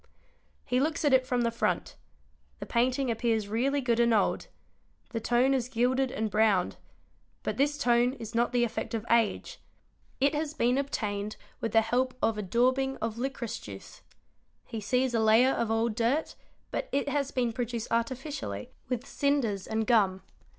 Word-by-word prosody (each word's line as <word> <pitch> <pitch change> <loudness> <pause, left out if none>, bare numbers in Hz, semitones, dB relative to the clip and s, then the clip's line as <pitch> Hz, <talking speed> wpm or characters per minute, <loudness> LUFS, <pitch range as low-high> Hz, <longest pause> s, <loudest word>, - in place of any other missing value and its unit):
He 250 +1 +1
looks 310 +3 0
at 285 - +4
it 255 -1 +4
from 250 -1 +1
the 235 - +1
front: 230 - -1 0.6
the - - -7
painting 255 +2 +1
appears 225 -2 0
really 265 +7 0
good 240 -2 +1
and 235 -1 +4
old; 205 - +1 0.6
the 230 - -2
tone 245 +4 +2
is 250 -2 -1
gilded 255 +2 +1
and 220 -4 -2
browned; 210 -4 +2 0.7
but - - -2
this 290 +2 +2
tone 245 -1 +3
is 225 -4 -8
not 235 +1 +1
the 245 -1 +2
effect 230 0 -3
of 225 0 -4
age; 235 - +1 0.6
it 280 +2 +3
has 305 0 -2
been 250 +1 +2
obtained 210 -6 -3 0.2
with 225 - -2
the 225 - +5
help 250 +3 0
of 225 - +1
a 210 - -3
daubing 255 +6 +1
of 225 0 -4
licorice 260 -3 -3
juice; 100 -2 -11 0.6
he 225 - -6
sees 250 +4 +1
a 230 - +2
layer 220 +4 +5
of 235 -4 -1
old 225 0 +1
dirt, 240 +7 0 0.4
but - - -3
it 280 +1 0
has 285 -1 0
been 245 -4 -1
produced 235 -1 -3
artificially 230 - -3 0.2
with 250 0 -2
cinders 260 -11 0
and. 220 0 -1
gum. 200 -5 +2
240 Hz, 170 wpm, -29 LUFS, 225-260 Hz, 0.7 s, the